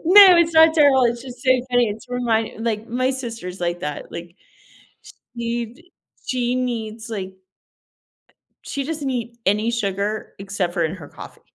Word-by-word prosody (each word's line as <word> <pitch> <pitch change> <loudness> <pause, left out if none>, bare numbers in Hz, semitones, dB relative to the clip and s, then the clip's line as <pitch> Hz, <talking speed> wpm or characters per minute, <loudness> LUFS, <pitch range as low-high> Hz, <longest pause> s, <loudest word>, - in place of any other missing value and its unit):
No, 375 +1 +9
it's 335 -1 +3
not 320 0 +7
terrible, 285 -4 +5
it's 235 0 0
just 255 -1 -10
so 260 - +2 0.2
funny, 245 -2 +3
it's 210 +1 -7
remind 230 -2 -1
like, 220 -1 -2
my 255 +2 0
sister's 230 -9 -6
like 175 0 -2
that. 150 -2 -5
Like, 170 +1 -8 1.0
she'd 235 +4 -4 0.4
she 250 -1 0
needs, 230 -3 -3
like 190 -3 -5 1.3
she 280 -1 -4
doesn't 305 -2 -3
eat 235 -2 -4
any 210 +4 +2
sugar 205 -1 -2
except 195 -3 -3
for 170 - +1
in 160 - -2
her 150 -5 -11
coffee. - - -12
235 Hz, 155 wpm, -22 LUFS, 205-255 Hz, 1.3 s, No